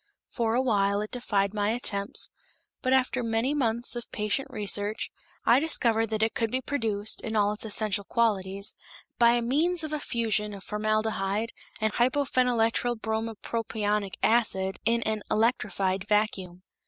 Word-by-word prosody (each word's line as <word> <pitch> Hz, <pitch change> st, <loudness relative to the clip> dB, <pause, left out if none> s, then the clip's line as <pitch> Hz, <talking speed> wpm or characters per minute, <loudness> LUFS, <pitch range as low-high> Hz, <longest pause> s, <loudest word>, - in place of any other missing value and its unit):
For 230 Hz, -4 st, 0 dB
a 255 Hz, -, +2 dB
while 200 Hz, -4 st, +2 dB
it 215 Hz, -, -5 dB
defied 200 Hz, -5 st, 0 dB
my 205 Hz, -1 st, 0 dB
attempts, 210 Hz, -3 st, 0 dB, 0.5 s
but, 255 Hz, -, 0 dB
after 255 Hz, -1 st, +2 dB
many 230 Hz, +4 st, 0 dB
months 240 Hz, -4 st, 0 dB
of 240 Hz, -, -7 dB
patient 210 Hz, +5 st, -1 dB
research, 210 Hz, -2 st, -1 dB, 0.3 s
I 240 Hz, -, +6 dB
discovered 230 Hz, -7 st, +3 dB
that 220 Hz, 0 st, -1 dB
it 220 Hz, -, +1 dB
could 230 Hz, -1 st, -1 dB
be 255 Hz, -, 0 dB
produced, 220 Hz, -6 st, -1 dB
in 220 Hz, 0 st, -4 dB
all 205 Hz, -1 st, +3 dB
its 210 Hz, -, -3 dB
essential 210 Hz, -1 st, -1 dB
qualities, 200 Hz, -3 st, 0 dB, 0.5 s
by 235 Hz, 0 st, +5 dB
means 320 Hz, +8 st, +1 dB
of 310 Hz, -1 st, -4 dB
a 305 Hz, -, -1 dB
fusion 220 Hz, -5 st, -1 dB
of 195 Hz, -, -10 dB
formaldehyde 215 Hz, 0 st, -1 dB, 0.3 s
and 220 Hz, -2 st, 0 dB
hypophenyltrybrompropionic 225 Hz, -4 st, 0 dB
acid 195 Hz, -5 st, +2 dB
in 230 Hz, 0 st, +2 dB
an 215 Hz, -1 st, -1 dB
electrified 195 Hz, -4 st, 0 dB
vacuum. 190 Hz, -4 st, 0 dB
220 Hz, 140 wpm, -27 LUFS, 205-240 Hz, 0.5 s, I